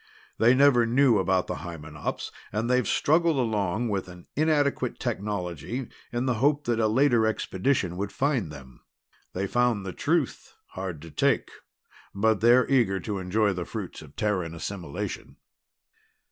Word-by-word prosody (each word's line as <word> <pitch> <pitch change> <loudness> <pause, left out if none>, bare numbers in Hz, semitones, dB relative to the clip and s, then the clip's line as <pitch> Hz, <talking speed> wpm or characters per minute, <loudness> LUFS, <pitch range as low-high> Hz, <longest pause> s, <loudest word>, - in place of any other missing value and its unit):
They 120 +3 +5
never 130 -4 +5
knew 125 -2 +4
about 95 -1 +1
the - - -4
Hymenops, 75 -2 -6 0.2
and 110 +3 -1
they've 125 -3 +2
struggled 160 0 +2
along 110 -2 0
with 95 -2 -2
an 90 -1 -12
inadequate 145 -4 +1
technology 105 - -3 0.2
in 120 +1 -1
the 130 - +2
hope 145 +1 +3
that 120 -3 0
a 110 - +3
later 120 -1 +3
expedition 95 -3 -1
would 100 +1 -3
find 130 - 0
them. 65 -4 -12 0.5
They 95 +2 -1
found 120 -2 +1
the 95 - -5
truth 155 -2 -1
hard 95 -5 -6
to 85 - -10
take, - - +1 0.6
but 110 +1 +2
they're 120 +2 +5
eager 115 -8 +2
to 105 -3 -3
enjoy 100 +3 +1
the 90 -1 -3
fruits - - -6
of 75 -2 -14
Terran 95 -6 -1
assimilation." 85 -2 -5
110 Hz, 150 wpm, -26 LUFS, 90-125 Hz, 0.6 s, They